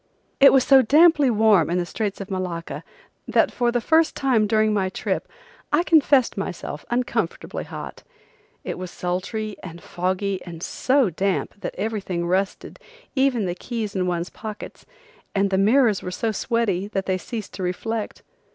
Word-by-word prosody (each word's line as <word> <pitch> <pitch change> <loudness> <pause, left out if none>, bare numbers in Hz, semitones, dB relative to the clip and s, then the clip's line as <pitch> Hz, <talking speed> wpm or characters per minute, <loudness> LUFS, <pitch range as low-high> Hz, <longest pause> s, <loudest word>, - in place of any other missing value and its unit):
It 275 - +9
was 265 -2 +5
so 270 0 +6
damply 295 +2 +5
warm 215 -7 +4
in 175 - 0
the 175 - 0
Straits 205 +3 -3
of 195 0 -7
Malacca 180 -3 -4 0.4
that - - +3
for 240 -1 0
time 240 0 0
first 320 +5 +3
time 245 -6 +2
during 215 0 +2
my 195 -2 0
trip - - -3 0.4
I 300 +4 +3
confessed 285 -7 +4
myself 180 -6 -5
uncomfortably 245 +1 -2
hot. - - -8 0.6
It - - -5
was 185 -1 -5
sultry 195 +5 -4
and 170 -2 -9
foggy 185 +2 -2
and 170 -1 -9
so 260 -6 +1
damp 190 +4 -1
that - - -5
everything 195 -4 -2
rusted, 190 +3 -2 0.3
even 265 -6 +2
the 175 - -1
keys 215 +1 -5
in 185 -1 0
one's 175 0 -2
pockets, 215 -2 -9 0.5
and 195 0 +2
the 190 - +2
mirrors 220 0 +4
were - - -5
so 220 +5 -2
sweaty 210 -4 -1
that 195 -2 -3
they 185 -1 0
ceased 220 +1 -6
to - - -7
reflect. 210 +5 -3
205 Hz, 165 wpm, -23 LUFS, 185-240 Hz, 0.6 s, It